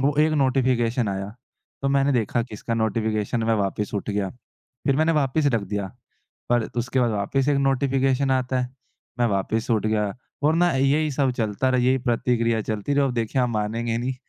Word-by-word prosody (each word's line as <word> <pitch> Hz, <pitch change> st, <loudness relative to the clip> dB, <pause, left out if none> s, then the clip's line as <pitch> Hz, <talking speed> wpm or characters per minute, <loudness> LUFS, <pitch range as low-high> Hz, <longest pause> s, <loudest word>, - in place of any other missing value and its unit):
वो 140 Hz, +2 st, +2 dB
एक 155 Hz, 0 st, +3 dB
नोटिफ़िकेशन 125 Hz, -3 st, +1 dB
आया 100 Hz, +2 st, -4 dB, 0.5 s
तो 135 Hz, -, +1 dB
मैंने 140 Hz, 0 st, +2 dB
देखा 120 Hz, 0 st, +1 dB
किसका 115 Hz, 0 st, -5 dB
नोटिफ़िकेशन 110 Hz, 0 st, -1 dB
मैं 115 Hz, 0 st, +2 dB
वापस 105 Hz, +2 st, -3 dB
उठ 105 Hz, +1 st, -2 dB
गया 100 Hz, -2 st, -1 dB
फ़िर 125 Hz, +2 st, -5 dB
मैंने 160 Hz, +1 st, +3 dB
वापस 145 Hz, 0 st, +1 dB
रख 110 Hz, -, +1 dB
दिया। 100 Hz, 0 st, -3 dB, 0.6 s
पर 120 Hz, -2 st, +2 dB
उसके 120 Hz, +2 st, 0 dB
बाद 120 Hz, -2 st, +2 dB
वापस 120 Hz, +7 st, 0 dB
एक 140 Hz, -, +3 dB
नोटिफ़िकेशन 135 Hz, 0 st, +1 dB
आता 130 Hz, -1 st, +1 dB
है 125 Hz, -, -2 dB, 0.5 s
मैं 120 Hz, -, +3 dB
वापस 110 Hz, +4 st, -1 dB
उठ 110 Hz, -1 st, +2 dB
गया 105 Hz, -2 st, 0 dB, 0.3 s
और 155 Hz, +2 st, +4 dB
ना 175 Hz, 0 st, +3 dB
यही 140 Hz, +3 st, +2 dB
सब 135 Hz, -1 st, +1 dB
चलता 110 Hz, +3 st, 0 dB
रहा 130 Hz, -, +2 dB
यही 130 Hz, +2 st, +3 dB
प्रतिक्रिया 115 Hz, -2 st, +1 dB
चलती 110 Hz, +6 st, -2 dB
रही 140 Hz, 0 st, +3 dB
अब 130 Hz, -, 0 dB
देखिए 115 Hz, +2 st, 0 dB
आप 125 Hz, -, +1 dB
मानेंगे 115 Hz, +1 st, -1 dB
नहीं 130 Hz, +2 st, -2 dB
120 Hz, 190 wpm, -24 LUFS, 110-135 Hz, 0.6 s, और